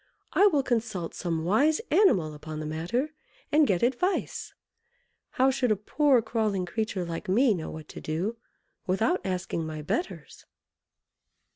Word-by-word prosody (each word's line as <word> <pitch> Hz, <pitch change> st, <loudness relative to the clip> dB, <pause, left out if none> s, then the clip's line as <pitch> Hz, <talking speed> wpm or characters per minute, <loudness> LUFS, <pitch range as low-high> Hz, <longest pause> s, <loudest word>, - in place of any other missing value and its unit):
I 405 Hz, -, +6 dB
will 295 Hz, -8 st, +2 dB
consult 220 Hz, -9 st, -2 dB
some 165 Hz, -2 st, -2 dB
wise 275 Hz, -, +3 dB
animal 240 Hz, -, +4 dB
upon 155 Hz, +1 st, -7 dB
the 155 Hz, -, -4 dB
matter, 175 Hz, -, -2 dB, 0.4 s
and 300 Hz, -1 st, +5 dB
get 185 Hz, 0 st, +1 dB
advice. 265 Hz, +11 st, -1 dB, 0.8 s
How 265 Hz, +1 st, +4 dB
should 255 Hz, -3 st, +1 dB
a -, -, +4 dB
poor 255 Hz, +4 st, +2 dB
crawling 215 Hz, -4 st, 0 dB
creature 210 Hz, -2 st, -2 dB
like 170 Hz, +1 st, -5 dB
me 230 Hz, +4 st, +4 dB
know 165 Hz, -5 st, -4 dB
what 155 Hz, -1 st, -8 dB
to -, -, -9 dB
do 180 Hz, +9 st, -2 dB, 0.5 s
without 225 Hz, -, +1 dB
asking 185 Hz, -3 st, -2 dB
my 155 Hz, -1 st, -5 dB
betters?" 345 Hz, -, -4 dB
215 Hz, 145 wpm, -27 LUFS, 170-265 Hz, 0.8 s, I